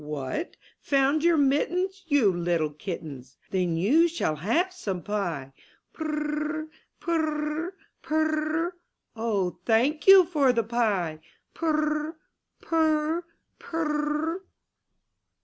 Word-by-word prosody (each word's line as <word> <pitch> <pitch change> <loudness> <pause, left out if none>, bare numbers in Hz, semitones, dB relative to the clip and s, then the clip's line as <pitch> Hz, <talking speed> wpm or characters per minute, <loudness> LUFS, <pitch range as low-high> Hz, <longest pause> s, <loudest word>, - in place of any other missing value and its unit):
"What, 150 - -4 0.2
found 280 +2 +2
your 340 -1 +4
mittens, 355 +7 +1
You 275 - +4
little 170 -3 0
kittens! 150 -6 -7
Then 180 -3 0
you 285 - +4
shall 315 - -1
have 320 - +1
some 195 - -4
pie.*' 170 -10 -3 0.4
*Turr 315 - -4 0.5
r, 310 - -8 0.3
purr 310 -2 -1
r, 355 +3 -5 0.3
purr 310 0 0
r, 350 - -5 0.4
O, 210 -5 -1
thank 270 +8 +2
you 385 -2 +10
for 295 -6 +3
the 230 -1 +1
pie! 205 -9 0 0.3
Purr 320 -2 0
r, 305 +1 -1 0.5
purr 315 -1 +2
r, 345 - -7 0.3
purr 300 -1 -1
r. - - -15
295 Hz, 120 wpm, -27 LUFS, 190-320 Hz, 0.5 s, you